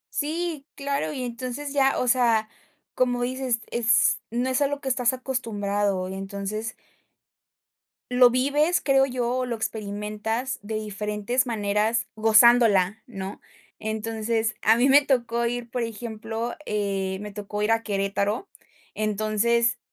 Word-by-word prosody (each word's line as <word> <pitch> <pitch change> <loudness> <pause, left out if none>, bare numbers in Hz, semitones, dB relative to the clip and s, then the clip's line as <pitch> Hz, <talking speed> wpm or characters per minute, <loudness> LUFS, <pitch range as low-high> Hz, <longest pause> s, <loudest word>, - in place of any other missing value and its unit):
Si 315 -1 -2
claro, 280 - -2
y 255 - -4
entonces 250 +4 -5
ya 270 -1 +2
o - - 0
sea, 230 -3 +3 0.5
como 245 -1 +1
dices, 255 -2 -1
es 230 -2 +3
no 245 +3 -1
es 260 +2 0
a 280 - +4
lo 285 0 -4
que 270 - -3
estás 250 -1 +2
acostumbrado, 205 -7 -1
y 190 - -5
entonces 200 +3 -4 1.4
lo 250 0 +7
vives, 285 +7 +2
creo 270 -1 +4
yo, 245 -2 -2
o 255 - 0
lo 240 -2 -2
experimentas 215 +3 -3
de 215 +2 -5
diferentes 210 +4 -1
maneras 215 +1 0
gozándola, 220 -3 +5
¿no?, 195 -4 -7 0.4
entonces, 220 0 -1
a 220 - +5
mí 245 +4 +3
me 280 +2 +7
tocó 235 -4 0
ir, 240 0 -4
por 245 -1 -2
ejemplo, 225 0 -4
eh, 195 -2 -1
me 210 0 -6
tocó 210 0 -4
ir 215 - +2
a 225 0 +3
Querétaro. 200 - -1 0.5
Entonces, 215 +3 +1
230 Hz, 140 wpm, -25 LUFS, 210-250 Hz, 1.4 s, lo